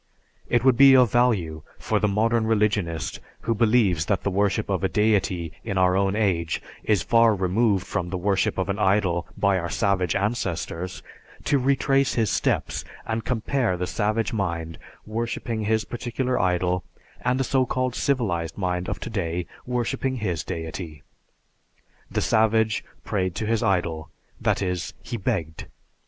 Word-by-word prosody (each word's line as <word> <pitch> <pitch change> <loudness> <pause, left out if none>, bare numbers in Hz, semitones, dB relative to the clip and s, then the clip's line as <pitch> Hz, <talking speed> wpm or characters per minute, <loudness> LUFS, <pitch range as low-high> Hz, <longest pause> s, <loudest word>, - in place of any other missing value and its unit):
It 120 0 +2
would 130 -3 +4
be 135 0 +8
of 125 -3 +5
value 100 -11 +1 0.2
for - - 0
the 105 - +2
modern 110 +2 +1
religionist 100 - 0 0.2
who 115 - 0
believes 105 -7 +2
that 100 - 0
the 100 - 0
worship 100 +3 +1
of 95 -1 -1
a 95 - +2
deity 100 -6 +1
in 100 -4 -3
our 90 0 +4
own 95 0 +1
age 90 -7 0 0.2
is 105 -5 +2
far 115 -2 +4
removed 95 +1 +1
from 90 -4 -3
the 90 - -2
worship 95 +1 0
of 95 - 0
an 100 +1 -2
idol 95 -4 +2
by 100 -2 +2
our 85 0 -4
savage 95 -4 +1
ancestors, 95 -4 -2 0.4
to 140 -1 +2
retrace 135 +1 +2
his 110 -5 +1
steps - - 0 0.2
and 110 -1 -3
compare 120 -4 0
the 90 - -2
savage 105 +7 -1
mind 85 -5 -3 0.3
worshiping 115 0 -3
his 110 0 +1
particular 125 +2 -2
idol 90 0 +1 0.4
and 125 +1 +1
a - - +2
so 130 -1 +1
called 130 0 -1
civilized 100 - -1
mind 90 -2 -2
of - - -3
today 90 -6 -3 0.2
worshiping 125 +2 -1
his 90 -9 -2
deity. 80 -2 -6 1.1
The - - -1
savage 110 -1 +2 0.2
prayed 95 -3 -1
to 110 - -2
his 115 0 +1
idol, 90 -7 0 0.3
that - - +1
is, 90 -2 -3
he 120 - -4
begged. 90 -8 -3
100 Hz, 155 wpm, -24 LUFS, 90-115 Hz, 1.1 s, be